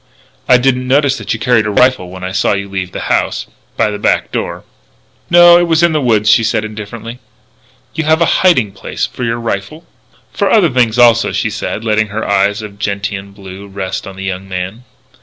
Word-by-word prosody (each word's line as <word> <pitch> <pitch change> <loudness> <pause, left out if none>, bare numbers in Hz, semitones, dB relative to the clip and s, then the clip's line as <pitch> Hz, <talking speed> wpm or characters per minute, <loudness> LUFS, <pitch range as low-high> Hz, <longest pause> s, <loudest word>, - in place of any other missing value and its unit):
"I 125 - +7
didn't 125 0 0
notice 140 +1 +2
that - - -5
you - - -2
carried 120 -4 +2
a - - -1
rifle 125 -3 +2
when 95 0 -10
I 95 - -4
saw 100 +2 +1
you 100 0 -3
leave 95 -2 -5
the - - -6
house - - -1 0.3
by 105 - +1
the 105 - -5
back - - 0
door." - - -4 0.7
"No; 175 0 +7
it 175 - +1
was 165 0 +2
in 170 - +4
the 155 -1 0
woods," 110 -5 +1
she 105 +2 +5
said 110 -1 0
indifferently. 110 +2 -8 0.7
"You 160 -1 -3
have 160 +1 +3
a 170 - +3 0.2
hiding 130 - +3
place 95 - -4
for 125 - -7
your 115 0 -1
rifle?" 115 - -5 0.5
"For 200 - 0
other 200 -7 +4
things, 120 -2 +1
also," 115 -1 +4
she - - -1
said, 110 - -4
letting 110 0 +1
her 105 +2 -4
eyes 100 +2 +1
of 100 -1 -10
gentian 100 -1 -4
blue 100 0 -11
rest 95 -1 -5
on 95 - -9
the 95 - -8
young 95 0 -5
man. 95 +6 -5
110 Hz, 210 wpm, -14 LUFS, 100-125 Hz, 0.7 s, I